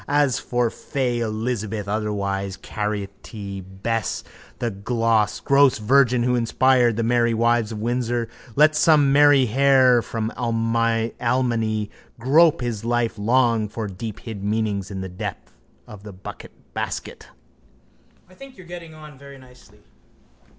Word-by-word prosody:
As 145 -3 +2
for 120 -2 -1
fay 125 -3 -2
Elizabeth, 110 -2 -3
otherwise 100 -2 -2
carrotty 100 -1 -5
Bess, 100 +4 -3 0.3
the 120 - -2
gross 115 +6 +2
virgin 125 +2 +3
who 125 +1 +1
inspired 120 0 +3
The 115 - 0
Merry 120 0 +2
Wives 115 -1 +1
of 110 - -5
Windsor, 120 +1 -1 0.3
let 155 +1 +5
some 150 -2 +4
meinherr 135 -3 +5
from 110 0 -3
Almany 115 -1 0 0.3
grope 145 +6 +4
his 115 -4 -3
life 120 -2 -1
long 115 -1 +2
for 110 0 -5
deephid 105 +1 -7
meanings 105 -2 -1
in 95 -2 -5
the 95 - -5
depths 90 - -7 0.3
of 105 -2 -12
the 105 -1 -10
buckbasket. 95 +1 -7 1.0
I 185 - -20
think 270 +5 -13
you're 185 - -13
getting 170 -2 -10
on 150 -3 -13
very 140 0 -12
nicely. 125 -5 -19
115 Hz, 120 wpm, -22 LUFS, 105-130 Hz, 1.0 s, let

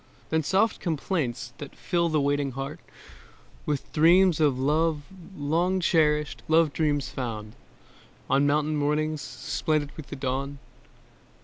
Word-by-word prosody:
Then 160 0 +2
soft 195 +8 +1
complaints 150 -7 -2
that 145 - -8
fill 170 -2 0
the 155 -1 +2
waiting 140 -1 0
heart 135 +3 -5 0.9
With 145 -2 -3
dreams 170 +2 +5
of 145 -5 +3
love 150 +3 +1 0.3
long 170 +6 +1
cherished; 150 -7 +2
love 160 -2 +4
dreams 145 -4 0
found 115 -5 -5 0.7
On 140 +1 +3
morning 150 +1 +1
mountains, 150 +1 0
splendid 150 -2 -2
with 155 - -9
the - - -6
dawn. 135 +1 -3
150 Hz, 125 wpm, -26 LUFS, 140-160 Hz, 0.9 s, dreams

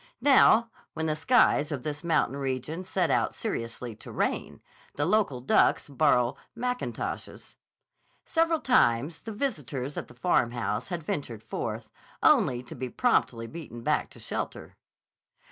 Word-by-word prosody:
Now, 235 -5 +5 0.2
when 160 - -2
the 155 -1 +1
skies 155 - +3
of 135 -4 -3
this 150 +2 -4
mountain 165 -5 +1
region 135 +5 -3
set 180 -4 0
out 120 -3 +1
seriously 115 0 -4
to - - -10
rain, - - -2 0.4
the 145 - 0
local 185 -9 +1
ducks 130 - +3
borrow 130 -4 +3 0.2
mackintoshes. 250 +1 -4 0.7
Several 330 -1 +1
times 160 - +2
the 225 - -7
visitor 155 - -3
at 145 - -5
the 120 - -16
Farmhouse 120 -4 0
had 175 -4 -4
ventured 120 -7 -4
forth, 110 - -5 0.3
only 125 0 +4
to 120 - -10
be 130 0 -5
promptly 120 - +1
beaten 120 -4 -9
back - - +1
to - - -14
shelter. - - -5
145 Hz, 140 wpm, -28 LUFS, 125-190 Hz, 0.7 s, Now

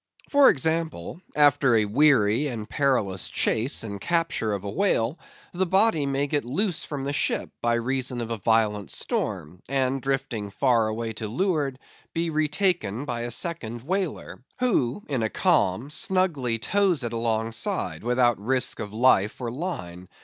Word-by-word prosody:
For 285 -1 +7
example,—after 145 - +1
a 110 -1 +3
weary 120 +1 +3
and 115 -5 -5
perilous 120 - 0
chase 115 +5 +1
and 100 -3 -6
capture 165 -10 0
of 100 -2 -3
a 100 - -4
whale, 160 - +1 0.3
the 185 +1 0
body 190 -6 +3
may 140 +1 0
get 145 0 -1
loose 175 - -1
from 145 -3 -5
the 140 +1 -2
ship - - -1
by 120 0 +2
reason 130 +1 -2
of 115 -1 -4
a 115 - -3
violent 105 -2 +1
storm; 85 +5 -3
and 135 -1 0
drifting 135 -6 -2
far 115 +1 +2
away 110 +1 -3
to 110 0 -5
leeward, 145 - -1 0.4
be 165 0 0
retaken 150 - 0
by 120 -4 -3
a 120 - -3
second 120 -5 -3
whaler, 180 -5 -3
who, 205 - 0
in 135 -5 -1
a 110 - 0
calm, 140 - +1
snugly 150 -10 +1
tows 185 - +1
it 120 -1 -3
alongside, 115 -7 -2
without 120 -2 +2
risk 130 +2 +1
of 105 - -5
life 110 -4 +3
or 120 -2 -3
line. 95 - -6
130 Hz, 155 wpm, -25 LUFS, 110-155 Hz, 0.4 s, For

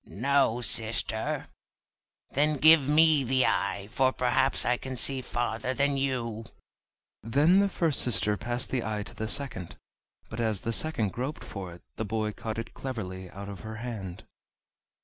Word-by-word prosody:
"No, 135 0 +1
sister." 115 -1 -1 0.9
"Then 150 +2 +2
give 155 -1 +6
me 155 -1 +5
the 130 +1 +2
eye, 100 0 0
for 130 +1 +2
perhaps 130 +1 +1
I 125 - +3
can 130 +1 -6
see 130 +1 +3
farther 120 +1 -2
than 140 0 +2
you." 120 -5 -2 0.8
Then 145 - +4
the 200 0 +3
first 165 -6 +1
sister 105 -3 +3
passed 120 +3 -3
the 125 -3 -1
eye 105 -1 -3
to - - -11
the 110 - -4
second, 110 -8 -2 0.5
but 110 - -8
as 110 -4 0
the 115 - -2
second 115 -7 0
groped 130 +8 -5
for 95 -4 -7
it 85 - -14
the 110 - -2
boy 110 0 -2
caught 110 0 -6
it 115 - -6
cleverly 95 -8 -6
out 100 +2 -9
of 100 -2 -8
her 110 +3 -7
hand. 110 -6 -6
120 Hz, 165 wpm, -28 LUFS, 110-135 Hz, 0.9 s, give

